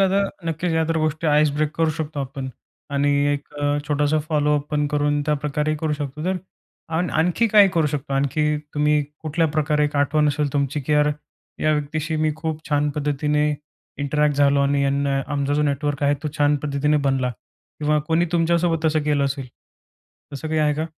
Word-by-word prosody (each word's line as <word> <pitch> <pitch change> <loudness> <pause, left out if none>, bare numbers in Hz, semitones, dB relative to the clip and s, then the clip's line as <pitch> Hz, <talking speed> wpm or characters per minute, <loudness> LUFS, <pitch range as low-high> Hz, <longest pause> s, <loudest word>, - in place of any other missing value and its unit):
आता 195 +1 +3 0.3
नक्कीच 165 +2 -1
या 160 0 +2
तर 165 - +1
गोष्टी 155 +1 -1
आईस 150 0 +4
ब्रेक 150 0 0
करू 165 -1 +2
शकतो 155 -2 -4
आपण. 135 0 -5 0.4
आणि 140 0 +1 0.2
एक 145 +1 -5
अ, 145 0 0
छोटासा 150 +1 +2
फॉलोअप 150 -2 +1
पण 150 -1 +1
करून 145 0 +1
त्याप्रकारेही 150 +1 -1
करू 155 -1 0
शकतो. 145 +1 -4
तर 185 0 0 0.6
आण 175 +2 0
आणखी 175 +8 +2
काही 205 -2 +7
करू 160 -2 +3
शकतो? 140 -1 -3
आणखी 150 +2 +1 0.2
तुम्ही 150 0 +2 0.2
कुठल्या 160 +1 +1
प्रकारे 150 0 +1
एक 145 0 -2
आठवण 150 +2 +2
असेल 145 -1 -1
तुमची, 145 0 0
की 145 +3 -2
यार 150 0 +4 0.5
या 155 - +3
व्यक्तीशी 155 +2 -2
मी 155 0 +1
खूप 160 0 -4
छान 150 0 +2
पद्धतीने 150 +1 0 0.5
इंटरॅक्ट 145 0 +1
झालो 140 0 +4
आणि 140 0 +2
यांना 140 0 +1
आमचा 140 0 0
जो 150 - +2
नेटवर्क 145 0 -1
आहे 145 0 +3
तो 150 - -1
छान 145 0 +3
पद्धतीने 150 +1 +1
बनला 130 -2 +1 0.5
किंवा 150 0 +2
कोणी 165 +1 +2
तुमच्यासोबत 165 -1 +1
तसं 155 -1 +2
केलं 145 -1 +1
असेल. 135 -1 -3 0.9
तसं 150 +3 -5
काही 155 0 0
आहे 150 -1 +3
का? 155 +2 -2
150 Hz, 185 wpm, -22 LUFS, 145-155 Hz, 0.9 s, काही